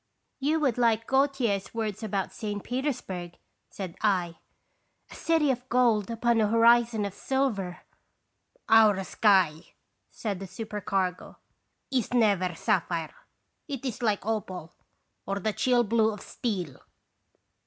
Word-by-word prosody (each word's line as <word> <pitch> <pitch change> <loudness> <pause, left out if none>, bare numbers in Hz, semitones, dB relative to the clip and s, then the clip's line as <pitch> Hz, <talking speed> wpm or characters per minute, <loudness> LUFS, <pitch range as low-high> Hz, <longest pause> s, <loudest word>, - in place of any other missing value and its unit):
" - - -50
"You 300 +4 +1
would 255 -5 +1
like 225 -2 +2
Gautier's 265 -8 0
words 215 -2 -3
about 200 -3 -2
St. 205 -3 -4
Petersburg," 245 - -4 0.3
said 185 -4 -7
I, 180 -5 +1 0.7
"a - - -9
city 320 -4 +2
of 250 0 -5
gold 235 -4 +3
upon 230 0 +1
a 210 - +3
horizon 230 -1 +4
of 200 - -5
silver." 225 -11 -2 0.4
" - - -41 0.2
Our 200 -3 +3
sky," 185 -6 +2 0.3
said 205 -5 -4
the 195 - -7
supercargo, 195 -2 -3 0.5
"is 250 -2 0
never 200 -6 +2
sapphire; 170 -6 -1 0.5
it 275 -2 -5
is 245 -3 -4
like 210 -4 0
opal 185 -6 -4 0.5
or 195 - -1
the 210 +2 -1
chill 245 +1 +2
blue 220 0 +2
of 210 - -8
steel." 185 - -4
215 Hz, 130 wpm, -27 LUFS, 190-240 Hz, 0.7 s, horizon